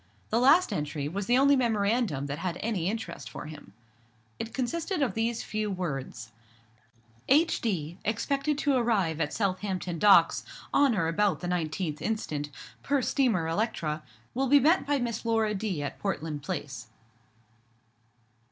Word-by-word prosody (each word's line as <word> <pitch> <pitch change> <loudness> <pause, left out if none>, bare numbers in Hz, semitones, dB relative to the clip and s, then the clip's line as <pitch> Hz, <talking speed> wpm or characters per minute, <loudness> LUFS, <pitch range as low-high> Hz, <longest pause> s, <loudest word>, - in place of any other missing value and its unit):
The 225 - +3
last 305 +9 +5
entry 150 -1 -2
was 195 +5 -4
the 245 - +4
only 280 +1 +5
memorandum 220 - +1
that 145 +2 -4
had 180 -1 -3
any 195 -6 -1
interest 225 +2 -5
for - - -8
him. 150 -9 -10 0.7
It 225 - -4
consisted 330 +8 -2
of 265 - 0
these 230 +1 -1
few 215 0 -2
words— 135 - -4 1.0
"H.D., 205 - +1
expected 275 +7 0
to 290 -1 +1
arrive 205 - +1
at 150 - 0
Southampton 185 -4 -2
Docks 205 +1 +5 0.3
on 280 -5 +4
or 165 -5 +1
about 195 +4 +1
the 175 - -3
19th 160 -2 -2
inst., 220 -5 -2 0.5
per 280 -2 +1
steamer 230 - +1
Electra; 165 -5 -1 0.3
_will 265 +1 0
be 285 +1 +7
met 310 +3 +3
by 290 0 +2
Miss 240 -3 -3
Laura 225 -2 +1
D. 195 -7 -2
at 145 - -5
Portland 160 -7 -3
Place." 140 -8 -5
205 Hz, 145 wpm, -28 LUFS, 165-245 Hz, 1.0 s, be